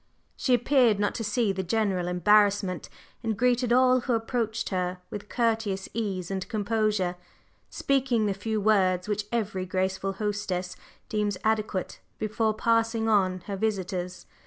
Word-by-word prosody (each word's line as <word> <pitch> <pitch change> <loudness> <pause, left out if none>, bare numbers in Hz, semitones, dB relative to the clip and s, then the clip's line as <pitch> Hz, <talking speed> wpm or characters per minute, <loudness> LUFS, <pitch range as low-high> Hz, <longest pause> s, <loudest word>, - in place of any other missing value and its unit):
She 255 - +2
appeared 245 -4 +3
not 205 0 +1
to 225 - -4
see 210 0 +1
the 190 0 -2
general 190 -2 0
embarrassment, 195 +1 +2 0.3
and 220 -2 -2
greeted 245 0 +2
all 255 +1 +5
who 245 0 -1
approached 225 -1 -1
her 180 -1 -1
with 205 0 -7
courteous 220 -5 0
ease 195 -5 -3
and 190 +2 -3
composure, 215 -4 0 0.5
speaking 260 -5 +1
the 200 - +1
few 215 +3 -2
words 190 -3 +2
which 210 0 -1
every 200 -5 -2
graceful 190 +1 -1
hostess 190 -3 -3 0.3
deems 210 -3 -1
adequate 215 -3 -1 0.2
before 215 0 0
"passing 225 0 +1
on" 185 -4 +2
her 200 +2 -5
visitors. 185 -3 -3
210 Hz, 140 wpm, -27 LUFS, 190-225 Hz, 0.5 s, all